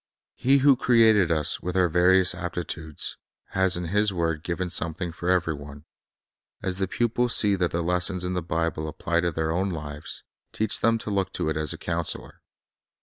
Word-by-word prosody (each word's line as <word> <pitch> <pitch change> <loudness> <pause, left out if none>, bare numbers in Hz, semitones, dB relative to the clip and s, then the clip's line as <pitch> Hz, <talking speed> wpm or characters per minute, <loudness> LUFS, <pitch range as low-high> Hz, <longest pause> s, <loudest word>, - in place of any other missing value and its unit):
He 135 +2 +3
who 140 -2 +7
created 110 -8 +4
us, 80 -2 0
with 90 +1 -3
our 90 -1 +4
various 90 +2 +4
aptitudes, 85 -3 -5 0.3
has 95 -1 +1
in 85 -2 -4
His 105 +2 +2
word 85 -4 -1
given 90 +1 -3
something 85 +1 -2
for 85 +2 -4
every 90 -3 +2
one. 70 0 -10 0.8
As 95 0 -2
the 95 - 0
pupils 120 +3 +1
see 105 -2 +4
that 90 -2 +1
the 85 0 -2
lessons 90 +1 +1
of 90 0 -2
the 90 - -1
Bible 80 -1 -2
apply 85 +2 -1
to 85 0 0
their 80 0 -1
own 95 +4 0
lives, 75 -3 -6 0.3
teach 110 -1 +1
them 115 0 +3
to 110 - -5
look 95 -1 0
to - - -1
it 80 - -1
as 75 -1 0
a - - -3
counselor. 85 -1 -4
90 Hz, 190 wpm, -25 LUFS, 80-95 Hz, 0.8 s, who